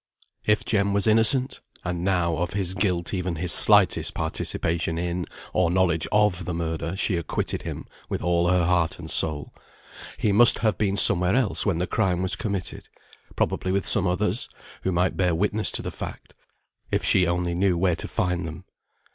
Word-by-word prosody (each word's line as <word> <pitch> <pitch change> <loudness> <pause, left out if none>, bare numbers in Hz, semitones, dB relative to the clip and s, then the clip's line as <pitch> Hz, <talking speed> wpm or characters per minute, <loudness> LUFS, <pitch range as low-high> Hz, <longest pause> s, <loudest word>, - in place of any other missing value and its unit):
If 105 0 +1
Jem 100 -2 0
was 100 0 +1
innocent 115 +4 +4 0.2
(and 90 -1 -4
now, 90 -4 0
of 85 0 -3
his 95 -2 -1
guilt, 90 -3 -2
even 90 -2 -3
his 85 +2 +1
slightest - - +5
participation 80 0 -2
in, 85 +1 -3 0.3
or 90 -2 +1
knowledge 85 -3 +1
of, 105 -4 +1
the 90 - -4
murder, 80 +1 -4
she 95 -2 0
acquitted 85 -3 -3
him - - -7 0.2
with - - -4
all 85 0 +1
her 90 -1 +2
heart 85 -2 0
and 80 -2 -8
soul), 75 -3 +1 0.6
he 105 - 0
must 120 +4 +6
have 110 -2 0
been 100 -2 0
somewhere 90 0 +4
else 125 -4 +1
when 95 -5 0
the 90 - -1
crime 90 -3 -1
was 95 - 0
committed; 100 -4 -5 0.5
probably 95 - -1
with 100 0 -1
some 100 -3 +4
others, 90 -1 -1 0.3
who 95 - -2
might 90 +1 -1
bear 90 -3 +1
witness 105 +4 +1
to - - -2
the - - -5
fact, - - -9 0.6
if - - -1
she 90 -2 +4
only 85 0 -1
knew 90 0 0
where 90 -1 +1
to - - -4
find 90 -1 -2
them. 80 +4 -10
90 Hz, 180 wpm, -24 LUFS, 85-100 Hz, 0.6 s, must